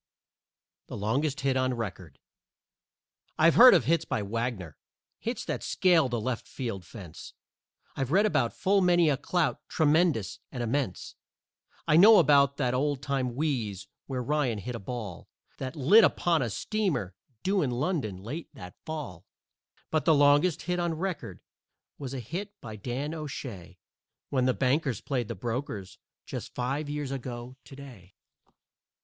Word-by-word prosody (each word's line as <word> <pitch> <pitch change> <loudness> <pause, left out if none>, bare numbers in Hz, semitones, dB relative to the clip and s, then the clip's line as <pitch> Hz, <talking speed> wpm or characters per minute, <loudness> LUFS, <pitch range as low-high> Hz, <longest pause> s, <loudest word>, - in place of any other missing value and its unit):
THE - - -7
LONGEST 135 +8 -1
HIT 135 -1 +1
ON 130 -1 +1
RECORD 95 - -6 1.2
I've 165 +2 +5
heard 250 -3 +9
of 150 -10 +2
hits 165 +4 +2
by 105 - -2
Wagner, 105 -6 -3 0.4
hits - - -4
that - - -3
scaled 170 -7 +3
the 120 -1 -1
left 120 +2 -3
field 115 -8 -5
fence, 95 -8 -11 0.6
I've 135 0 -2
read 200 +5 +4
about 130 - +1
full 195 +1 +3
many 175 -3 +4
a - - +2
clout 165 +3 -1
tremendous 155 - +1
and 125 -2 -4
immense; 120 -5 -2 0.7
I 155 - +5
know 210 +5 +9
about 140 -4 +4
that 125 -4 0
old 140 +1 0
time 130 -3 -1
wheeze 115 - -2 0.2
where 130 -2 -3
Ryan 135 -4 0
hit 120 +5 -5
a 115 - -5
ball 100 -4 -7 0.3
That 130 +3 -5
lit 175 - +6
upon 170 -4 +2
a 120 - -1
steamer 165 - -2 0.3
due 195 0 +2
in 140 - 0
London 125 - -2
late 125 - -7
that 90 0 -10
Fall. 125 - -7 0.6
But 155 -1 0
the 160 - +5
longest 145 +4 +4
hit 180 0 -1
on 170 -2 -1
record 155 - -4 0.6
was 135 -2 -5
a - - -3
hit 190 - -6
by 110 -2 -8
Dan 125 +8 -4
O'Shay 130 - -7 0.5
When 130 -2 +1
the 130 - +2
Bankers 135 -2 +1
played 125 -5 -2
the 115 - -5
Brokers 115 -2 -5 0.3
just - - -7
five 140 +4 -2
years 145 -2 -3
ago 125 -1 -6
to 135 - -12
day. 120 -10 -13
135 Hz, 155 wpm, -28 LUFS, 115-155 Hz, 1.2 s, heard